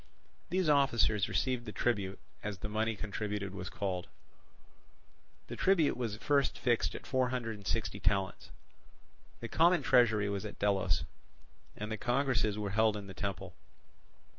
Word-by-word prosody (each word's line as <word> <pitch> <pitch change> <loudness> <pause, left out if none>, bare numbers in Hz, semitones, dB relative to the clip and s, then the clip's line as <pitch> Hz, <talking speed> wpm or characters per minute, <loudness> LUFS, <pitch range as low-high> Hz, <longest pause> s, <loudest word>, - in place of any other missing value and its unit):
These 185 0 +1
officers 120 -8 +3
received 125 -2 0
the - - -4
tribute, 100 -5 -1 0.2
as 105 -2 -4
the 105 - -5
money 110 +1 0
contributed 105 -1 -4
was 95 -2 -5
called. 95 -3 -3 1.4
The - - -7
tribute 180 -6 +3
was 115 -4 -3
first 140 +3 +1
fixed 120 -2 +1
at - - -8
four 130 -2 +1
hundred 120 -3 -3
and 100 -2 -11
sixty 80 - -1
talents. 95 0 -1 0.9
The 115 - -4
common 170 +8 +4
treasury 115 -6 +4
was 100 0 -2
at 105 - -7
Delos, 95 -4 +1 0.7
and 105 +1 -5
the 110 - -2
congresses 120 -4 +1
were 105 -2 -2
held 110 0 +3
in 100 - -7
the 95 - -9
temple. 95 -2 -4
110 Hz, 150 wpm, -32 LUFS, 100-125 Hz, 1.4 s, common